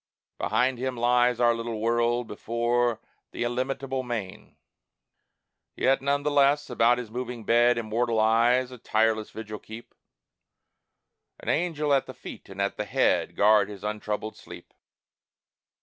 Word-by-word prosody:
Behind 125 0 +1
him 130 -1 -3
lies 120 0 +2
our 120 -1 +4
little 115 -1 -4
world: 120 +2 +1
before 120 +2 -1 0.3
The - - -4
illimitable 130 +2 -2
main. 115 -7 -6 1.2
Yet, 135 0 +2
none 140 +1 0
the 150 - 0
less, 145 0 +3
about 120 0 +3
his 120 -3 -6
moving 125 -1 -5
bed 120 +2 +4
Immortal 115 0 0
eyes 120 +3 +3
a 125 - -10
tireless 110 0 +1
vigil 110 -1 -8
keep 110 +2 -11 1.5
An - - -6
angel 155 -3 0
at 135 - +2
the - - -9
feet - - -11
and 95 0 -10
at 100 0 -1
the 105 - -3
head - - +1
Guard 105 0 +4
his 100 -1 -10
untroubled 105 0 -4
sleep. - - -13
120 Hz, 140 wpm, -26 LUFS, 110-125 Hz, 1.5 s, our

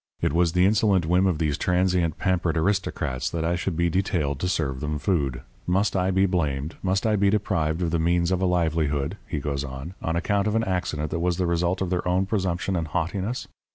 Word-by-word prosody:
It - - 0
was 85 -1 +2
the 90 0 +4
insolent 100 -3 +3
whim 90 +3 +3
of 90 -4 +1
these 75 -1 -1
transient, 90 -3 +1
pampered 90 -4 0
aristocrats 90 -7 -1
that 80 -1 -2
I 85 +1 +1
should 90 -1 -2
be 85 0 +2
detailed 80 -6 0
to 90 - -1
serve 70 -7 -1
them 75 +2 -2
food. 70 -8 0 0.3
Must 100 +3 +1
I 90 0 +1
be 95 +1 +3
blamed 75 -5 -1
must 95 +1 0
I 110 -1 +3
be 100 -1 +3
deprived 85 -5 0
of 85 - 0
the 85 - +1
means 85 +1 +2
of 95 0 +1
a 95 - +2
livelihood,' 80 -2 0
he 85 - -3
goes 70 -1 -2
on, 65 +5 -7
'on 80 - -1
account 100 +4 +1
of 105 - 0
an 115 - +2
accident 90 -6 -2
that 85 - -1
was 90 0 0
the 90 - +1
result 85 +2 0
of 90 - -3
their 90 -1 -1
own 90 +2 +2
presumption 95 -2 -1
and 80 -2 -1
haughtiness? 95 +8 -2
90 Hz, 225 wpm, -25 LUFS, 80-95 Hz, 0.3 s, the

